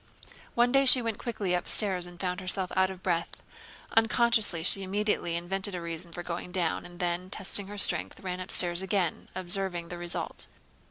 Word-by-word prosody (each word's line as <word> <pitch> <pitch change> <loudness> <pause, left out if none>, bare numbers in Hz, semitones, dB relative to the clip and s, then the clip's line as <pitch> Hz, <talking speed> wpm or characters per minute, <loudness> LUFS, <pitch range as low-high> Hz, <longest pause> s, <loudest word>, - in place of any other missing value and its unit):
One 240 +1 +3
day 275 +1 +3
she 255 - +11
went 225 -2 -3
quickly 205 -6 -3
upstairs 180 0 +2
and 175 -1 -14
found 180 -1 -3
herself 185 0 -3
out 190 0 +2
of 190 -1 -10
breath. 170 -2 -2 0.5
Unconsciously 225 -5 +2
she 195 +3 +3
immediately 195 -3 -2
invented 190 +3 -3
a - - -4
reason 170 +1 -6
for 175 +1 -7
going 175 +1 -6
down, 175 -3 -2
and 175 0 -15
then, 175 0 -2
testing 195 +1 0
her 205 +1 -9
strength, - - +5
ran 185 -1 -5
upstairs 180 -1 +2
again, 190 -3 -2
observing 180 -2 -1
the 175 - -7
result. 175 0 -3
185 Hz, 175 wpm, -28 LUFS, 175-200 Hz, 0.5 s, she